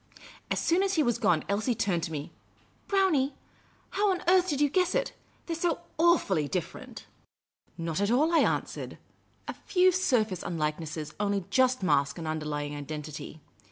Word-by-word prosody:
As - - 0
soon 345 +3 +2
as 390 0 +1
he 315 - +3
was 240 -2 0
gone, 175 -9 +2
Elsie 215 +5 0
turned 185 -5 0
to - - -7
me. 150 -1 -5 0.3
" - - -35
Brownie, 315 -9 +2 0.6
how 410 0 +2
on 365 -2 -1
earth 370 0 +4
did 285 -3 -1
3'ou 290 -1 +2
guess 365 -1 +2
it? - - 0 0.3
They 335 - -3
're - - -4
so 335 -1 0 0.2
awfully 260 - +3
different!" 180 +2 -5 0.4
" - - -65 0.2
Not 165 +1 -2
at 205 - +1
all," 300 +8 +3
I 330 - +6
an.swered. - - -1 0.3
" - - -38
A - - -3
few 370 0 +3
surface 235 - +1
unlikenesses 155 -1 -3
only 200 -2 0
just 255 -1 +3
mask 140 -4 +2
an 165 - -6
underlying 150 -2 -3
identity. 150 +1 -7
210 Hz, 180 wpm, -28 LUFS, -, 0.6 s, I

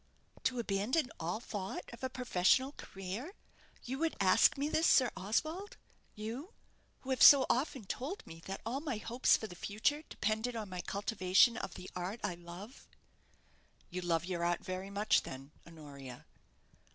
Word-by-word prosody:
"To 255 - +1
abandon 235 +6 0
all 170 +6 -2
thought 205 -5 -5
of 235 - -11
a 260 - 0
professional 250 +1 +2
career! 205 - -7 0.5
You 265 +2 -4
would 325 0 0
ask 185 +5 +5
me 280 +2 0
this, 320 +1 +2
Sir 255 -3 +5
Oswald 310 - -2 0.4
you 235 - -6 0.5
who 265 - -5
have 260 - 0
so 275 -2 +10
often 260 -1 -1
told 305 - -4
me 165 0 -11
that 195 0 -5
all 245 +4 -1
my 285 -6 -3
hopes 235 +4 +3
for - - -6
the 210 - -8
future 215 - 0
depended 220 +3 -1
on 215 -3 -4
my 180 -1 -4
cultivation 200 +3 +3
of 195 - -5
the 185 - -8
art 180 +5 -4
I - - 0
love?" 175 +8 -11 1.0
"You 180 - -3
love 170 -2 0
your 175 -2 -2
art 175 0 0
very 185 +1 -4
much 205 +2 +3
then, 135 +2 -9 0.2
Honoria?" 140 -6 -10
215 Hz, 165 wpm, -34 LUFS, 180-260 Hz, 1.0 s, so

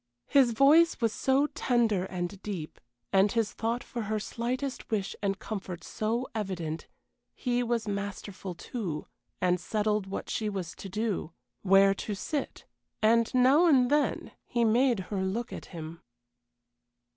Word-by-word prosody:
His 265 -4 +4
voice 300 +8 +5
was 230 -3 +1
so 270 +2 +2
tender 230 -9 +1
and 185 +1 -4
deep, 180 -7 -6 0.3
and 195 +1 +5
his 230 -3 0
thought 230 +2 -2
for 240 - -5
her 215 0 0
slightest 250 +5 -3
wish 205 -3 -1
and 195 -1 0
comfort 185 -6 -6
so 230 +7 -2
evident; 180 -7 -3 0.5
he 245 -1 0
was 235 -2 -1
masterful, 200 -2 -5
too, 175 -4 -4 0.4
and 180 0 +2
settled 210 -1 0
what 195 - -5
she 215 -1 -1
was 190 -4 -4
to 195 - -7
do 205 -5 -2 0.3
where 195 0 +6
to 205 +1 -4
sit, 285 +8 -4 0.4
and 230 +1 +4
now 270 +7 +6
and 260 -5 +4
then 295 0 +1 0.2
he 235 -1 +1
made 235 -1 +3
her 195 - 0
look 220 +5 -2
at - - -7
him. 165 -1 -8
215 Hz, 145 wpm, -29 LUFS, 190-240 Hz, 0.5 s, where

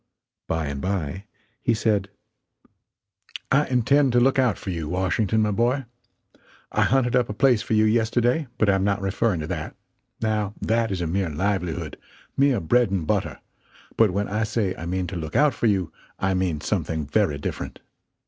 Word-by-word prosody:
Bye 80 -1 -1
and 70 -1 -4
bye, 95 0 -3 0.4
he - - +2
said: 105 -3 0 1.4
"I 145 +2 +3
intend 130 +2 +3
to 120 - +5
look 135 +2 +3
out 125 -8 +2
for 95 - -5
you, 80 -3 -4
Washington, 95 +4 +1
my 105 - +1
boy. 120 +6 +1 0.9
I - - +1
hunted 130 -2 +2
up 125 -2 +2
a - - -2
place 125 -3 +3
for 110 - -1
you 110 - +4
yesterday, 120 +6 +2
but 110 - +2
I 100 - +4
am 95 0 +1
not 100 0 +1
referring 100 -1 0
to 75 - -4
that, 80 -4 -4 0.4
now 105 -2 -1
that 115 0 +1
is 95 -2 -2
a - - -1
mere 90 +2 -1
livelihood 90 0 -2 0.4
mere 135 -4 +3
bread 120 +7 +2
and 95 -4 -1
butter; - - -1 0.5
but 115 -2 +4
when 100 +2 -1
I 105 +2 -1
say 105 -3 -1
I 85 - -7
mean 90 +1 -1
to 90 - -6
look 80 -3 -5
out 150 -2 +4
for 115 - 0
you 95 -6 0 0.2
I 95 0 0
mean 90 -5 -1
something 80 -2 -2
very 85 -1 +1
different. 70 - -5
100 Hz, 185 wpm, -24 LUFS, 90-115 Hz, 1.4 s, to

